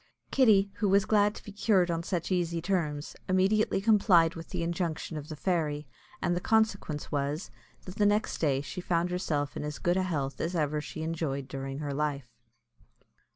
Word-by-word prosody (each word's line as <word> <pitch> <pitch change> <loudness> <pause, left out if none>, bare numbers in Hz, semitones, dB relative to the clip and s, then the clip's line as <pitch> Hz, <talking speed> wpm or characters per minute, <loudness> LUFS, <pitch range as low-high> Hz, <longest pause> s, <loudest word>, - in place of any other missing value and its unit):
Kitty, 205 -7 +4
who 205 - +1
was 200 +1 +4
glad 210 0 +3
to - - -10
be 210 - -9
cured 200 -3 +2
on 165 0 -1
such 170 +1 -3
easy 170 -2 0
terms, 160 -5 -2
immediately 190 +3 +3
complied 195 -6 +4
with 165 -2 -9
the - - -2
injunction 170 -2 -2
of 150 +1 -6
the 155 - -5
fairy; 150 -3 -1 0.4
and 175 -1 +1
the 175 - -2
consequence 210 -9 0
was, 145 +3 -2 0.3
that 185 +2 -9
the 210 - +3
next 210 +1 +1
day 140 -4 +2
she 180 +5 -6
found 175 0 0
herself 145 -7 -1
in - - -4
as 150 0 -4
good 175 +1 +1
health 150 -8 -1
as 170 +3 -2
ever 150 -2 0
she 155 +2 -6
enjoyed 155 -5 -2
during 135 0 -5
her 145 -1 -3
life. 140 -4 -2
170 Hz, 185 wpm, -29 LUFS, 150-195 Hz, 0.4 s, Kitty